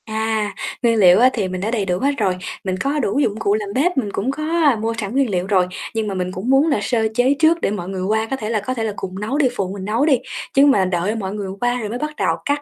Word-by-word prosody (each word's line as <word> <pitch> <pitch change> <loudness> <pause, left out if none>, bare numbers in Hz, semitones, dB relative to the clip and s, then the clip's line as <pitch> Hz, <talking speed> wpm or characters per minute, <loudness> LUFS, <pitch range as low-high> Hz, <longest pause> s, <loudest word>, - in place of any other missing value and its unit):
À, 220 -2 -1 0.3
nguyên 230 -1 +3
liệu 185 -1 +7
á, 250 +2 +6
thì 205 -5 -1
mình 185 0 -4
đã 215 +3 -1
đầy 215 -5 0
đủ 180 -1 -1
hết 280 - +2
rồi. 190 -5 0 0.3
Mình 185 -1 -1
có 280 +5 0
đủ 235 0 0
dụng 220 -6 0
cụ 205 -2 +1
làm 210 -2 -3
bếp, 315 +5 +1
mình 215 -6 0
cũng 235 +7 -1
có, 305 +3 -5
a, 315 -4 +3
mua 225 +1 -2
sẵn 210 -1 -4
nguyên 270 -2 +2
liệu 180 -1 -1
rồi. 185 -3 +3 0.3
Nhưng 220 -1 -1
mà 200 - -2
mình 185 -1 -2
cũng 190 +6 -4
muốn 270 +4 +4
là 285 -9 +2
sơ 220 +1 +1
chế 250 +4 +3
trước 325 +1 +4
để - - 0
mọi 185 -3 -4
người 190 -1 -4
qua 220 +3 0
có - - +1
thể 220 -5 -5
là 225 -2 +1
có 230 +6 -3
thể 230 -3 -3
là 215 -2 -2
cùng 190 -1 -6
nấu 220 +7 -2
đi, 290 -3 +4
phụ 190 -4 -2
mình 195 -2 -6
nấu 225 +7 +1
đi. 285 -5 +4 0.4
Chứ 275 +1 +6
mà 235 -10 +4
đợi 185 +3 -1
mọi 195 -3 -4
người 205 -2 -4
qua 245 0 +1
rồi 215 -3 -4
mới 235 - -3
bắt 300 +1 -4
đầu - - +1
cắt 285 0 0
220 Hz, 305 wpm, -20 LUFS, 195-265 Hz, 0.4 s, liệu